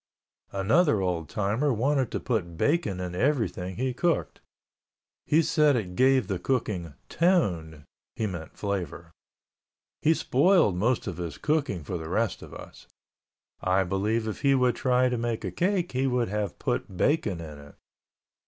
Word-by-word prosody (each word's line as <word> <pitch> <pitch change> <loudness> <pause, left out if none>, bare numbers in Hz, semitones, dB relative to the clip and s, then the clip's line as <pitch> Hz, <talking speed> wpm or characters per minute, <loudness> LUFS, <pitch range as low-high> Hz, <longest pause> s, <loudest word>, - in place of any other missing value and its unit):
Another 110 - +3
old 90 -5 -2
timer 110 +8 0
wanted 130 +1 +1
to - - -2
put 85 -9 -2
bacon 145 - +1
in 90 -1 -4
everything 95 - -1
he 130 +1 -1
cooked. 120 - -1 0.9
He 160 +2 +4
said 150 -2 +3
it 95 -6 -3
gave 130 0 +4
the 95 -3 -2
cooking 90 - -2
"tone" 85 - 0 0.3
(he 110 - -1
meant 90 -6 -6
flavor). 90 -5 -4 0.9
He 160 +2 +4
spoiled 150 - +3
most 115 +7 +1
of 95 -5 -5
his 85 -4 -5
cooking 145 - -1
for 90 +4 -4
the 80 0 -7
rest 110 +3 0
of - - -11
us. - - -12 0.7
I 95 +1 +2
believe 105 +5 -1
if 110 - -5
he 140 -1 +4
would 125 -2 +2
try 125 0 +2
to 125 -2 -1
make 115 -1 -2
a - - -3
cake 180 -1 0
he 130 +2 0
would 125 -4 0
have 105 -2 -3
put 95 - -3
bacon 120 - +1
in 75 -3 -8
it. 70 0 -14
110 Hz, 160 wpm, -27 LUFS, 90-135 Hz, 0.9 s, He